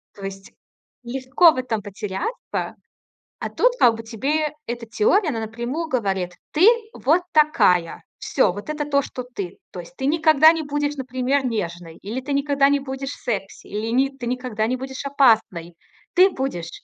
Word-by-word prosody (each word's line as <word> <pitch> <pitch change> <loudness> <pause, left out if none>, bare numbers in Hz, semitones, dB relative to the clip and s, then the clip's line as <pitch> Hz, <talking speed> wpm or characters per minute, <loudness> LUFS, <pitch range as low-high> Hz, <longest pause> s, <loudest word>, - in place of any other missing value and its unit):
То 200 - -12
есть 195 0 -8 0.5
легко 265 +7 +4
в 280 - -7
этом 235 -4 -2
потеряться. 205 - -5 0.6
А - - -4
тут - - +2
как 230 -2 +5
бы 225 - -8
тебе 285 +7 -1
эта 240 0 -4
теория, 405 - +2
она 235 -6 -2
напрямую 240 +9 -4
говорит: 195 - -1 0.2
"Ты 345 +7 +5 0.3
вот 320 +7 +2
такая". 180 - +3 0.2
Всё, - - +2
вот 205 +9 -8
это 300 -1 -2
то, 280 -1 +2
что 255 -2 -7
ты. 200 -8 -7
То 180 - -8
есть 215 +10 -16
ты 265 - -3
никогда 315 0 +5
не 325 -1 -3
будешь, 290 0 -2
например, 260 +1 -1
нежной, 175 -7 -4
или 225 +7 -4
ты 280 +2 -4
никогда 280 0 +2
не 285 - +2
будешь 270 0 -5
секси, 205 -5 -5
или 230 +6 0
ты 240 - -5
никогда 250 -3 -2
не 255 - -1
будешь 265 +1 -7
опасной. 220 -11 +2 0.4
Ты 370 +2 +6
будешь 175 - -4
255 Hz, 170 wpm, -22 LUFS, 215-290 Hz, 0.6 s, Ты